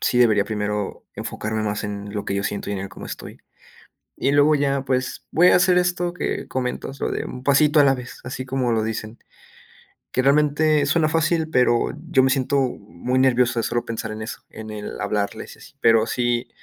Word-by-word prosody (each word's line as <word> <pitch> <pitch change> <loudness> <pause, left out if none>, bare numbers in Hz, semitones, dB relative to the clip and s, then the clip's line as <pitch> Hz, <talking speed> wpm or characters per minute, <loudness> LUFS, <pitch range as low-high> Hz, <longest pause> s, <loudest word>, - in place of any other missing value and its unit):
sí 125 - +1
debería 105 -4 +4
primero 105 -2 -3
enfocarme 110 0 -3
más 105 +1 -2
en 100 0 -6
lo 105 - -3
que 100 - -2
yo 100 - -1
siento 100 0 -3
y - - -1
en 100 - -2
el 95 +1 -5
cómo - - -10
estoy. - - -9 0.8
Y 140 - +1
luego 145 +1 +5
ya, 140 -1 +1
pues, 130 -1 -2
voy 180 +3 +6
a - - +6
hacer 180 0 +4
esto 180 -1 0
que - - -3
comentas, 130 +1 -3
lo - - -1
de - - -2
"un 125 0 -8
pasito 150 +2 +4
a - - +7
la 135 -1 +4
vez", 125 -1 -9
así 130 0 -5
como 130 -2 0
lo 110 -1 +1
dicen, 110 +1 -4 0.9
que 130 - +1
realmente 150 +1 +3
suena 155 +1 +2
fácil, 160 0 +1
pero 125 -4 +2 0.2
yo 130 -5 +5
me 130 - +3
siento 135 +1 +1
muy 125 -1 -2
nervioso 125 -2 +3
de - - +1
solo 120 0 -1
pensar 110 -1 -4
en 110 - -7
eso, 110 - -7
en 110 0 -9
el 105 -1 -6
hablarles 100 0 -3
y - - -23
así, - - -15
pero 115 -1 +4
sí, 120 0 -1
125 Hz, 210 wpm, -22 LUFS, 110-145 Hz, 0.9 s, a